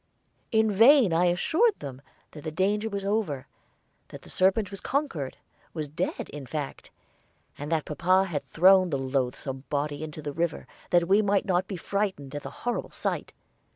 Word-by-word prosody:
In 220 -2 +3
vain 225 - +6
I 170 +2 +3
assured 325 - +2
them 135 -2 -7 0.3
that 150 - -11
the - - -3
danger 200 +6 0
was 200 -2 -4
over, 195 -11 -1 0.6
that - - -11
the - - -12
serpent 190 +2 +2
was 195 - -7
conquered 220 - -2 0.4
was 155 -2 -3
dead, 145 - -3
in 145 -3 -8
fact; 150 -1 -5 0.7
and 145 +2 -6
that 160 -2 +1
papa 185 +5 +2
had 160 -6 -3
thrown 185 +2 +5
the 140 - 0
loathsome 135 0 -2
body 145 0 -2
into 155 -1 -7
the 145 -1 -4
river, 170 +2 -2 0.2
that 175 -1 +3
we 200 +3 +5
might 200 -1 +1
not 185 -1 +1
be 195 - -5
frightened 190 -7 -2
at 145 - -4
the - - -7
horrible 245 -1 -3
sight. - - -3
175 Hz, 175 wpm, -27 LUFS, 145-200 Hz, 0.7 s, vain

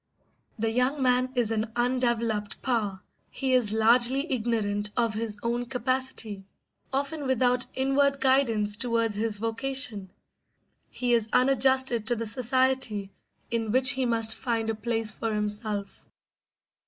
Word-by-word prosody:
The 225 0 -1
young 255 +4 +1
man 255 0 +2
is 235 -3 +1
an 220 0 -2
undeveloped 235 -4 -1
power; 215 -7 -1 0.3
he 265 -1 -1
is 245 -5 +2
largely 245 +7 +3
ignorant 215 -4 -1
of 230 -2 +1
his 215 -1 -3
own 240 +1 -2
capacity, 250 -5 -2 0.5
often 280 +2 -2
without 250 -1 +2
inward 275 +1 +1
guidance 230 -7 +2
towards 230 -2 0
his 215 0 -2
vocation; 225 -2 -2 0.8
he 245 -1 -1
is 225 -2 +1
unadjusted 260 -3 +3
to 240 - +2
the 230 0 -4
society 255 -3 0 0.4
in 225 -2 -1
which 260 +3 +5
he 265 -2 -1
must 225 -1 +1
find 225 -3 -2
a - - -3
place 225 0 -1
for 225 +2 -4
himself. 210 -1 -3
235 Hz, 130 wpm, -27 LUFS, 220-260 Hz, 0.8 s, which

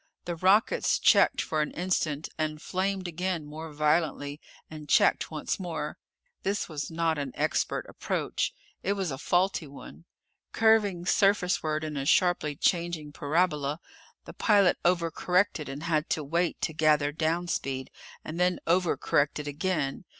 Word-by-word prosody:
The 175 - -3
rockets 190 +6 +3
checked - - +4
for 155 -1 -1
an 150 - -1
instant, 165 -4 -1
and 155 -1 -2
flamed 190 +2 -2
again 175 -1 -2
more 155 +2 -8
violently, 150 -1 0 0.3
and 150 -2 -10
checked - - +3
once 155 +3 -3
more. 175 -3 -4 0.4
This 200 +1 -1
was 155 -3 -5
not 165 -2 0
an 140 -3 -4
expert - - -1
approach. - - -2 0.3
It 195 - 0
was 190 -5 -2
a 135 - -5
faulty 180 -3 +1
one. 85 - -12 0.5
Curving 210 -6 +3
surface 195 -2 +2
ward 155 0 -2
in 155 -2 -4
a 135 0 -3
sharply 175 -5 +2
changing 170 -2 0
parabola, 150 -1 0 0.5
the - - -9
pilot 200 -4 +3
over 170 -2 +2
corrected 180 -3 0
and 140 +3 -6
had 160 -2 0
to 155 - -1
wait 170 +4 -1
to 160 - -1
gather 150 -2 +3
down 165 +3 -1
speed, 130 -5 -3 0.3
and 160 +2 -5
then 180 0 +2
over 175 +1 +2
corrected 145 +1 0
again. 150 0 -2
160 Hz, 150 wpm, -28 LUFS, 150-180 Hz, 0.5 s, checked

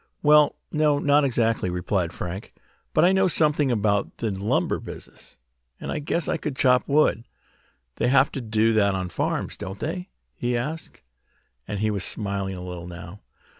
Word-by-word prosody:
"Well, 150 0 +6 0.2
no, 150 -2 +3
not 145 +1 +3
exactly," 115 -7 +1
replied 90 0 -1
Frank. 90 +4 -6 0.4
"But 155 - +4
I 180 - +5
know 190 0 +3
something 150 -4 +2
about 105 -3 0
the 115 -2 -1
lumber 100 +2 0
business, - - -11 0.4
and - - -5
I - - -2
guess 155 +3 -1
I - - 0
could 150 -3 -4
chop 130 -3 +3
wood. 140 - +3 0.7
They - - +1
have 135 +2 +4
to 135 - -4
do 110 0 +2
that 100 -3 +3
on 95 -1 -3
farms, - - -2
don't 95 +2 -6
they?" 180 +4 -4 0.2
he 120 0 -1
asked, 150 - -5 0.6
and 105 -1 -3
he 110 0 +1
was 100 -3 -1
smiling 100 -3 -2
a 90 - -7
little 90 -1 -7
now. 85 +3 -9
115 Hz, 170 wpm, -25 LUFS, 100-145 Hz, 0.7 s, Well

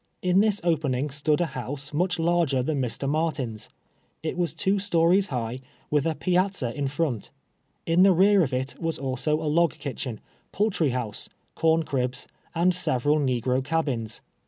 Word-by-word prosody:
In 180 +1 +4
tills 210 -1 +2
opening 150 -5 0
stood 150 +3 +1
a - - +3
house 135 +4 -5
much 180 +3 +1
larger 165 -6 +2
than 145 0 -1
Mr. 125 +2 -2
Martin's. 140 -8 -2 0.5
It 160 - -2
was 175 -5 -1
two 200 +1 +1
stories 185 +1 +3
high, 125 0 -3 0.3
with 150 0 +2
a 160 - 0
pia/.za 185 -8 0
in 145 -1 -2
front. 135 -5 -2 0.6
In 165 +2 +3
the 195 +1 +7
rear 195 +3 +5
of 145 -6 0
it 130 +1 -3
was 165 -1 -1
also 135 +3 -1
a 160 - -4
log 165 +2 +3
kitchen, 130 -5 -5 0.3
poul 210 +2 +1
try 165 -6 +1
house, 120 -4 -4 0.3
corncribs, 155 -6 0 0.3
and 175 +2 +3
several 145 -3 +1
negro 130 -1 0
cabins. 130 -8 -2
150 Hz, 160 wpm, -26 LUFS, 130-170 Hz, 0.6 s, the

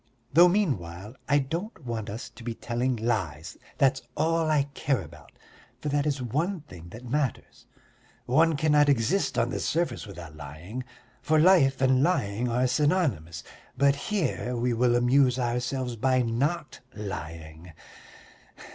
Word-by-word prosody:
Though 170 +4 +8
meanwhile 105 - -2
I 145 - +5
don't 165 - -4
want 115 -3 -4
us 110 +4 -7
to 120 - -13
be 115 -1 -4
telling 120 +2 -1
lies. 95 -10 -2 0.2
That's 135 -1 +3 0.2
all 165 +1 +1
I 150 -2 +3
care 135 -7 0
about, 75 - -14 0.5
for 150 - -3
that 145 +1 +1
is 140 -3 -1
one 160 - -1
thing 90 - -12
that 115 +7 -11
matters. 135 0 -3 0.6
One 160 +4 +3
cannot 150 -1 +4
exist 140 - +1
on 115 +1 +1
the - - -2
surface 155 -9 -1
without 85 -6 -10
lying, 75 - -7 0.4
for 155 - +2
life 155 -6 +5
and 130 0 +4
lying 125 - 0
are 125 +2 +1
synonymous, 130 - 0 0.3
but 140 0 +4
here 145 - -2
we 120 +1 0
will 120 +1 +2
amuse 125 +1 +3
ourselves 125 0 -2
by 130 +2 +2
not 145 +8 -1 0.2
lying. 80 -4 -7
125 Hz, 145 wpm, -27 LUFS, 110-150 Hz, 0.6 s, Though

